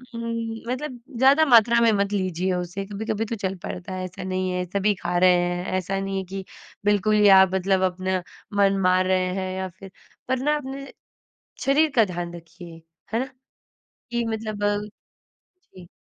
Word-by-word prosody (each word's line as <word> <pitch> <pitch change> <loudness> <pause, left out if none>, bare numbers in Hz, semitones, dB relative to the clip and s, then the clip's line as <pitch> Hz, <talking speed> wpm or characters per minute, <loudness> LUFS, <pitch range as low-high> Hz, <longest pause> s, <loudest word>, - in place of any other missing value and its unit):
उम्म, 230 0 -4
मतलब 255 -1 -4 0.2
ज़्यादा 275 +5 +5
मात्रा 235 -2 +6
में 230 - +5
मत 200 -1 0
लीजिए 185 -1 -1
उसे, 180 +2 -4
कभी-कभी 215 +2 -3
तो 230 +1 -4
चल 195 -2 -3
पड़ता 185 +1 -6
है, 185 - -4
ऐसा 185 0 -8
नहीं 185 0 -2
है 180 0 -1
सभी 200 +3 +1
खा 175 -1 -2
रहे 185 0 +6
हैं। 175 0 -1
ऐसा 195 +1 -2
नहीं 195 0 -3
है 190 - -2
कि 195 0 -5 0.4
बिल्कुल 205 +1 +3
ही 210 -1 +5
आप 190 -1 +5
मतलब 190 0 +1
अपना 185 0 -2 0.4
मन 195 -1 +4
मार 185 0 +3
रहे 185 -1 +2
हैं 185 -1 -3
या 190 0 -2
फिर 195 -1 -11 0.4
पर 260 +1 +1
ना 295 +3 +1
अपने 275 0 -7 0.7
शरीर 295 +4 +3
का 225 -3 +6
ध्यान 175 -2 -5
रखिए 165 0 -12 0.3
है 230 - +2
ना? 260 - -1 0.9
कि 235 -1 0
मतलब 215 -2 -2 1.1
जी। 180 -2 -12
195 Hz, 175 wpm, -24 LUFS, 185-225 Hz, 1.1 s, मात्रा